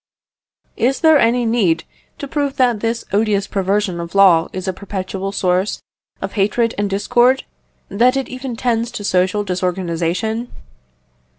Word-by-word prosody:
Is 260 Hz, +4 st, +1 dB
there 315 Hz, -2 st, +6 dB
any 240 Hz, 0 st, +2 dB
need 200 Hz, -8 st, +1 dB, 0.3 s
to 280 Hz, -, -6 dB
prove 285 Hz, -1 st, -2 dB
that 245 Hz, -4 st, +2 dB
this 230 Hz, +2 st, -2 dB
odious 205 Hz, -1 st, +1 dB
perversion 195 Hz, -2 st, -1 dB
of 170 Hz, +2 st, -7 dB
law 180 Hz, -4 st, +5 dB
is 185 Hz, 0 st, -5 dB
a 190 Hz, -, 0 dB
perpetual 195 Hz, 0 st, -5 dB
source 185 Hz, 0 st, 0 dB, 0.4 s
of -, -, -4 dB
hatred 225 Hz, +3 st, +1 dB
and 205 Hz, 0 st, -1 dB
discord, 240 Hz, +6 st, +2 dB, 0.4 s
that 245 Hz, +6 st, +2 dB
it 270 Hz, -, -2 dB
even 255 Hz, -1 st, -6 dB
tends 230 Hz, -1 st, 0 dB
to 210 Hz, -, -5 dB
social 185 Hz, +1 st, +1 dB
disorganisation? 185 Hz, +4 st, -2 dB
205 Hz, 140 wpm, -18 LUFS, 185-240 Hz, 0.4 s, there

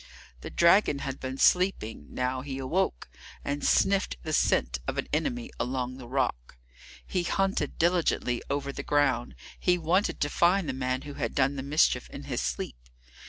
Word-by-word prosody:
The -, -, -7 dB
dragon 170 Hz, -3 st, +4 dB
had 135 Hz, 0 st, -4 dB
been 130 Hz, 0 st, -5 dB
sleeping, 160 Hz, -, +2 dB
now 130 Hz, +1 st, -2 dB
he 135 Hz, 0 st, -5 dB
awoke, 135 Hz, -, -1 dB, 0.4 s
and 145 Hz, +1 st, -2 dB
sniffed 195 Hz, 0 st, +2 dB
the 155 Hz, -, -3 dB
scent 60 Hz, -, +2 dB
of -, -, -2 dB
an -, -, -2 dB
enemy 245 Hz, -, -1 dB
along 130 Hz, 0 st, -2 dB
the 125 Hz, -, -9 dB
rock. 120 Hz, -, -2 dB, 0.5 s
He 180 Hz, -, -1 dB
hunted 195 Hz, +3 st, 0 dB
diligently 165 Hz, -8 st, +1 dB
over 140 Hz, 0 st, -1 dB
the -, -, -5 dB
ground; 135 Hz, -5 st, +1 dB, 0.2 s
he 180 Hz, -1 st, +3 dB
wanted 175 Hz, +5 st, +1 dB
to 145 Hz, -, +1 dB
find 175 Hz, 0 st, +3 dB
the 135 Hz, -, -1 dB
man 130 Hz, 0 st, -2 dB
who 145 Hz, -, -7 dB
had 120 Hz, -5 st, -3 dB
done 135 Hz, +1 st, +2 dB
the 135 Hz, -, -3 dB
mischief 145 Hz, +3 st, +2 dB
in -, -, -8 dB
his -, -, -3 dB
sleep. -, -, -3 dB
140 Hz, 170 wpm, -28 LUFS, 130-175 Hz, 0.5 s, dragon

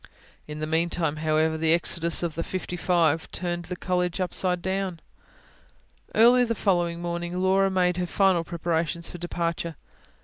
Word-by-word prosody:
In 150 Hz, 0 st, -6 dB
the -, -, 0 dB
meantime, 160 Hz, -1 st, 0 dB
however, 155 Hz, 0 st, +1 dB
the 160 Hz, 0 st, +4 dB
exodus 170 Hz, 0 st, +1 dB
of 170 Hz, -2 st, -1 dB
the 165 Hz, -, -3 dB
fifty 180 Hz, 0 st, -4 dB
five 165 Hz, -3 st, +1 dB
turned 175 Hz, -1 st, -3 dB
the 180 Hz, -, -5 dB
College 180 Hz, 0 st, -1 dB
upside 180 Hz, -1 st, 0 dB
down. 190 Hz, -2 st, -2 dB, 1.2 s
Early 245 Hz, +3 st, +6 dB
the 230 Hz, -1 st, -1 dB
following 175 Hz, -4 st, 0 dB
morning 175 Hz, +1 st, -3 dB
Laura 190 Hz, +1 st, +3 dB
made 180 Hz, -2 st, +1 dB
her 180 Hz, -1 st, -1 dB
final 185 Hz, -2 st, +2 dB
preparations 170 Hz, -1 st, -2 dB
for 175 Hz, -, -9 dB
departure. 170 Hz, -1 st, -3 dB
175 Hz, 150 wpm, -26 LUFS, 165-185 Hz, 1.2 s, Early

